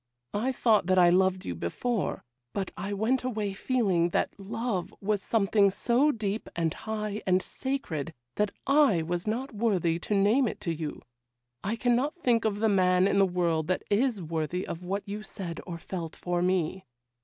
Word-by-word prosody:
I 230 +6 0
thought 225 -7 +3
that 185 0 +3
I 175 -1 +7
loved 185 0 +2
you 90 - -2
before; 190 - -2 0.3
but 195 -2 -2
I 200 - -4
went 220 +6 +1
away 215 -5 -2
feeling 195 -6 +1
that - - 0
love 215 -1 -3
was 205 0 0
something 200 -1 +3
so 240 +9 +2
deep, 215 -3 -3
and 165 -2 0
high, 215 -1 -4
and 185 0 +4
sacred, 190 - -3 0.2
that 210 +5 +1 0.2
I 275 - +4
was 175 +4 -3
not 255 +6 -2
worthy 190 -7 +1
to 205 - -1
name 215 +7 +4
it - - -4
to 170 - -1
you; 155 -2 -5 0.6
I 210 +4 -1
cannot 245 +4 +1
think 245 -10 +1
of 210 -1 0
the 225 - +4
man 185 -2 +4
in 200 - +2
the 195 - +5
world 170 -3 0
that 185 - 0
is 215 -2 +2
worthy 160 +2 -2
of 170 - -6
what 195 +3 -3
you 205 +1 -4
said 185 -5 -6
you 170 -2 -5
felt 165 -1 -6
for 175 -1 -1
me. 185 0 0
200 Hz, 180 wpm, -28 LUFS, 175-225 Hz, 0.6 s, I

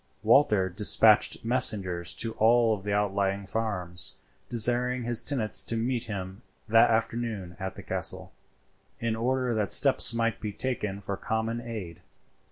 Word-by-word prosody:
Walter 110 -5 +3
despatched 105 +4 +3
messengers 100 -8 +3
to 115 -1 -2
all 115 0 +4
the 100 +2 -5
outlying 100 -1 -1
farms, 90 -4 -2 0.3
desiring 120 +2 0
his 120 -1 -1
tenants 120 -7 -1
to 115 - -2
meet 120 +1 -2
him 95 -1 -7 0.3
that 115 +1 +5
afternoon 110 -5 -2
at 95 0 -5
the - - -10
castle, - - -2 0.7
in 115 -1 -2
order 125 +1 -1
that 105 -4 -1
steps - - +4
might 115 0 -2
be 105 - -4
taken 105 -4 -3
for 100 0 -5
common 115 +1 -3
aid. 110 -8 -8
110 Hz, 140 wpm, -27 LUFS, 100-115 Hz, 0.7 s, that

